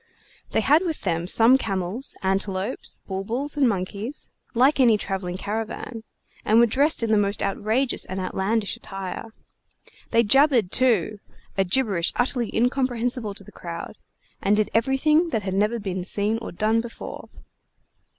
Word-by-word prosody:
They - - +1
had 300 +4 +4
with 330 -4 -3
them 170 -2 -1
some 235 +7 +5
camels, 195 +5 -3
antelopes, 190 0 -2
bulbuls, 225 +10 -3
and 275 -4 +3
monkeys 205 +6 -4 0.3
like 265 +5 +4
any 235 -5 +5
travelling 190 -3 -4
caravan, 225 +3 -4 0.4
and 215 - +3
were 235 - +7
dressed 275 +4 +2
in 225 - 0
the 215 - +4
most 200 0 0
outrageous 220 +6 0
and 185 +1 -5
outlandish 195 +2 -1
attire. 195 -2 -6 0.8
They 230 0 +4
jabbered, 250 -3 +4
too, 215 -5 +2 0.4
a 195 - +2
gibberish 190 -3 +1
utterly 245 -2 0
incomprehensible 245 -3 0
to 200 - -8
the - - -14
crowd, 170 -1 -7 0.5
and 200 +2 +3
did 215 0 0
everything 285 +8 +3
that 225 -8 -1
had 190 -1 -3
never 210 +4 +1
been 190 -4 -4
seen 205 +4 0
or 230 - -7
done 215 +5 +1
before. 230 0 -9
220 Hz, 150 wpm, -24 LUFS, 195-250 Hz, 0.8 s, were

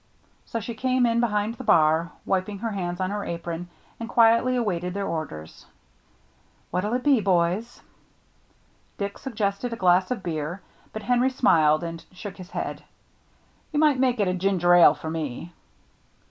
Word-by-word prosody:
So 230 - -3
she 225 +2 -6
came 255 +2 +1
in 230 0 +2
behind 210 -2 0
the 255 - -9
bar, 160 -3 +3
wiping 195 +2 -1
her 225 +2 -3
hands 175 -3 -3
on 185 0 -1
her 205 0 -3
apron, 170 0 -5 0.3
and 230 0 -6
quietly 230 +2 +4
awaited 180 -6 -2
their 200 0 -2
orders. 110 - -6 1.1
"What'llitbe, 235 +6 +1
boys?" 185 +5 0 1.2
Dick 200 0 -4
suggested 220 -1 -2
a - - -2
glass 185 -2 +3
of 245 -6 -3
beer, 165 +2 -4 0.3
but 215 - -7
Henry 250 +1 +2
smiled 160 - +3
and 165 -1 -6
shook 195 +1 -8
his 185 -1 -10
head. - - -5 0.9
"You 295 - 0
might 300 -4 +4
make 250 -2 +2
it 185 -3 +1
ginger 180 -2 +3
ale 175 -1 +7
for 160 - -6
me." 160 +1 -5
200 Hz, 150 wpm, -25 LUFS, 175-235 Hz, 1.2 s, ale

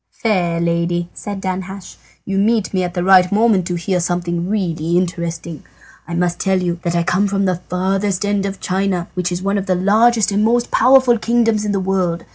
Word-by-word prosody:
"Fair 180 -7 +1
lady," 170 +1 -1
said 205 -1 -6
Danhasch, 190 0 -5 0.3
"you 195 0 -1
meet 215 0 +1
me 185 - +1
at 175 0 -4
the 175 - -1
right 185 -1 +5
moment 205 -4 +2
to 180 - -2
hear 180 +2 -1
something 175 0 -2
really 170 -5 -1
interesting. 170 -2 -3 0.5
I 170 - -4
must 175 0 -1
tell 190 -1 +1
you 175 -1 -2
that 170 -1 -2
I 170 - +1
come 185 +4 +1
from 195 0 0
the 180 -2 -1
furthest 190 +2 -1
end 205 -1 0
of 195 0 -6
China, 185 -2 -1
which 180 -1 -2
is 175 +1 -3
one 200 +1 0
of 195 - -6
the 185 - +2
largest 215 +4 +3
and 205 +1 +1
most 240 +2 +1
powerful 255 -1 +4
kingdoms 225 -2 +1
in 210 - -1
the 200 - 0
world. 185 -3 -1
185 Hz, 205 wpm, -18 LUFS, 175-205 Hz, 0.5 s, right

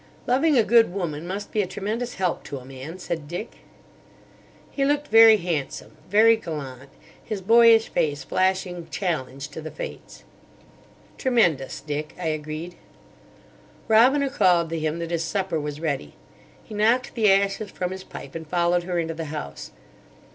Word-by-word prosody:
"Loving 275 +4 +3
a 230 - +5
good 230 -2 +4
woman 170 -4 -4
must 200 +3 -5
be 215 - +1
a 190 - -2
tremendous 215 +6 -4
help 180 -2 -1
to 140 - -6
a 125 - -11
man," 135 +6 -9
said 165 -4 -5
Dick. 175 +8 -6 1.1
He 275 - -1
looked 290 +1 0
very 225 -1 +8
handsome, 170 -7 -4
very 220 +3 +6
gallant, 140 - -7 0.3
his 215 - -4
boyish 225 +2 +6
face 145 -3 -1
flashing 185 -1 -1
challenge 145 -6 -3
to 155 +2 -8
the 155 - -6
Fates. - - -9 1.0
"Tremendous, 175 - +1
Dick," 150 0 -5
I 170 -3 -1
agreed. 155 +3 -5 1.1
Robina 260 +5 +4
called 180 - +3
to 165 - -2
him 155 +1 -2
that 170 0 -5
his 165 -1 0
supper 185 -1 -1
was 150 0 -5
ready. 140 - -3 0.5
He - - -12
knocked 230 +5 +2
the 215 -4 +4
ashes 195 +1 +1
from 180 -1 -4
his 190 0 -7
pipe, 140 - -10
and 160 -1 -7
followed 175 +1 +1
her 180 -1 -2
into 165 -1 -1
the 165 0 -5
house. 150 0 -7
175 Hz, 160 wpm, -24 LUFS, 155-215 Hz, 1.1 s, very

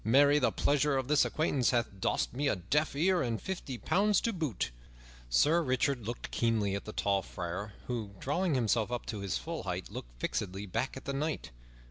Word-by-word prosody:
Marry, 140 +6 +5
the 130 - +3
pleasure 145 0 +2
of 130 -1 -1
this 150 +1 +4
acquaintance 145 -5 +1
hath 115 -5 0
dost - - 0
me 140 +3 0
a - - +2
deaf 140 - 0
ear 180 +4 +3
and 115 -3 -1
fifty 175 -9 -4
pounds 205 - +3
to 230 - 0
boot!" 150 - -2 0.6
Sir 150 - +4
Richard 130 -4 0
looked 120 - -5
keenly 110 -4 +1
at 100 - -3
the 110 - -5
tall 100 -2 +1
friar, 90 +4 -5
who, 115 -4 -3
drawing 170 +3 0
himself 115 -2 +1
up 120 - -3
to 105 - -4
his 100 -2 -1
full 165 0 -4
height, 90 -1 -4
looked - - -8
fixedly 95 +9 -2
back 130 +8 -2
at - - -9
the 140 - -2
knight. 150 +3 -2
125 Hz, 195 wpm, -32 LUFS, 100-150 Hz, 0.6 s, Marry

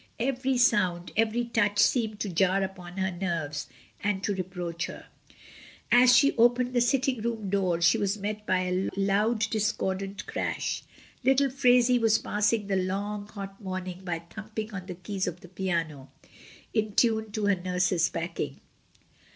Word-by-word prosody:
Every 260 +1 0
sound, 185 -7 +2
ever) 225 +2 +2
touch 210 -3 0
seemed 215 -1 +2
to 205 - -1
jar 190 +2 +2
upon 180 -1 -7
her 190 0 0
nerves 165 -5 -3 0.4
and 200 -1 0
to 205 - 0
re 190 - -2
proach 175 -2 -4
her. - - -10 0.9
As 250 +1 +7
she 280 +3 +5
opened 245 +2 +3
the 245 - +3
sitting 255 0 +1
room 220 -4 -3
do(ff, 180 -4 +1
she 170 - +5
was 200 +1 0
met 210 +1 -4
by 185 0 +2
a 185 +1 -1
loud 205 +3 +1
discordant 200 -2 -2
crash. - - -2 0.4
Little 270 +1 +3
Phraisie 250 -2 +4
was 225 -1 +4
passing 210 0 0
the 195 -1 -1
long, 200 +2 -2
hot 195 -1 -8
morning 185 -1 -5
by 175 -2 -2
thumping 215 +3 -6
on 185 -2 -6
the 180 - -6
keys 185 +2 -3
of 180 0 -5
the - - -12
piano 165 -7 -3 0.6
in 215 -2 0
time 220 -1 +2
to 215 -1 -1
her 200 -1 +4
nurse's 180 -1 +1
packing. - - -4
200 Hz, 160 wpm, -28 LUFS, 185-225 Hz, 0.9 s, As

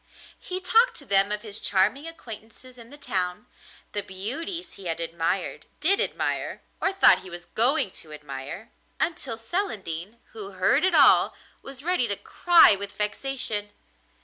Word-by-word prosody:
He 365 0 -5
talked 455 +6 +3
to 280 - -9
them 200 -2 +2
of 210 +1 -2
his 210 -1 -6
charming 255 +11 +2
acquaintances 245 -4 -11
in 230 0 -13
the 290 - -13
town, 185 -6 -2 0.5
the 205 - -2
beauties 280 - -4
he 195 - -11
had 165 -1 -1
admired, 170 +2 -2
did 380 +7 +3
admire, - - -2 0.2
or 385 - +1
thought 385 0 +5
he 185 - -11
was 175 0 -9
going 240 - +1
to 155 - -11
admire, 150 +5 -8 0.3
until 270 -8 -2
Celandine, 220 - -4
who 200 -3 -8
heard 195 - +3
it 375 -2 +3
all, - - +6 0.3
was 270 0 -9
ready 350 -8 +1
to 200 - -2
cry 340 - +5
with 200 0 -6
vexation. 210 -1 -2
220 Hz, 155 wpm, -26 LUFS, 190-290 Hz, 0.5 s, all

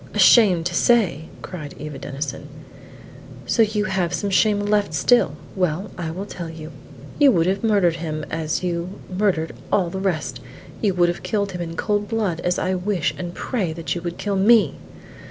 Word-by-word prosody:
"Ashamed 190 -8 +6
to 175 - -1
say!" 180 - +2 0.2
cried 155 -6 -7
Eva 150 -2 -7
Denison. 145 0 -5 1.0
"So 230 - +2
you 210 -1 +2
have 185 -3 0
some 200 -1 -2
shame 205 +2 +3
left 205 -5 +1
still! 155 - +3 0.2
Well, 180 +1 -1
I 170 -2 -4
will 185 +5 -5
tell 175 -4 -7
you. 160 -1 -9 0.5
You 285 -2 +7
would 165 -3 +3
have 195 +3 0
murdered 195 -7 +3
him, 155 -2 -4
as 160 +2 -2
you 175 +1 -3 0.2
murdered 180 -5 0 0.2
all 180 -4 +2
the 190 - -4
rest; 180 -6 -2 0.4
you 200 -4 +1
would 175 -1 +4
have 175 - -3
killed 200 -2 -1
him 180 -1 -5
in 165 -1 -5
cold 205 -1 0
blood, 210 -7 -1
as 180 +1 0
I 185 - 0
wish 180 -5 -1
and 175 +2 -6
pray 195 -11 -2
that 165 0 -3
you 175 - -4
would 175 0 -5
kill 205 -1 -2
me!" 200 -6 +5
180 Hz, 185 wpm, -22 LUFS, 165-205 Hz, 1.0 s, You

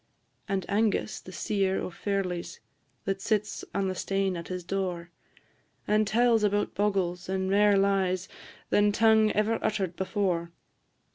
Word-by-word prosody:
And 195 -2 -1
Angus, 215 +1 0
the 185 - -12
seer 195 0 0
o' - - -4
ferlies, 180 -3 -3 0.5
That 195 0 -2
sits 210 -1 -1
on 195 -1 -1
the 185 - -1
stane 195 0 -1
at 170 -1 -6
his 180 -1 -5
door, 180 -2 -3 0.8
And 215 0 +3
tells 230 +1 +3
about 205 0 +1
bogles, 190 -3 -1
and 190 0 -1
mair 205 0 +5
lies 190 -2 +1 0.4
Than 205 0 +4
tongue 220 0 +4
ever 215 +2 +1
utter'd 195 -5 -1
before. 185 -3 -1
195 Hz, 140 wpm, -28 LUFS, 185-210 Hz, 0.8 s, mair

